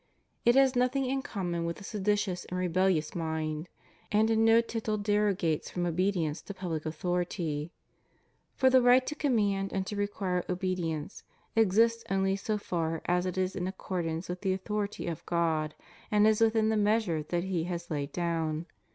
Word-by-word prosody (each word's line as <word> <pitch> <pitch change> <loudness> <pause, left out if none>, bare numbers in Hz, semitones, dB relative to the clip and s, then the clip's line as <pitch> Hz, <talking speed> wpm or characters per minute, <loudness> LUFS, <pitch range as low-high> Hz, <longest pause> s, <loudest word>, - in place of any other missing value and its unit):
It 240 +1 +6
has 270 -1 +5
nothing 255 +2 +2
in 265 +1 0
common 175 -8 -3
with 170 0 -3
a - - -11
seditious 205 -2 -1
and 180 - -5
rebellious 180 -3 +1
mind; 160 -1 -3 0.4
and 220 +1 +3
in 225 0 +3
no 225 0 +6
tittle 225 -2 -2
derogates 205 -6 +1
from 175 -1 -2
obedience 175 -2 0
to 200 - -8
public 165 -4 -3
author 175 +3 -1
ity; 165 -3 -3 0.8
for 260 -1 +4
the 260 0 +6
right 250 +1 +5
to - - -3
command 205 -10 +1
and 190 -1 -1
to 210 - -5
require 200 -3 -1
obedience 180 -3 -2 0.3
exists 225 +2 +3
only 195 0 +2
so 210 +2 -2
far 165 -5 -2
as 180 +1 +1
it 185 - -4
is 185 0 0
in 180 -1 -2
accordance 175 -3 -3
with 180 0 -5
the 190 -2 +1
authority 205 +2 -3
of 170 -2 -4
God, 160 -3 0 0.3
and 210 0 +4
is 220 0 +3
within 220 -1 +3
the 220 - +2
measure 210 -6 +2
that 170 +3 -2
He 180 -3 -1
has 175 -1 -5
laid 145 -1 -2
down. 165 -2 -1
185 Hz, 175 wpm, -30 LUFS, 170-210 Hz, 0.8 s, It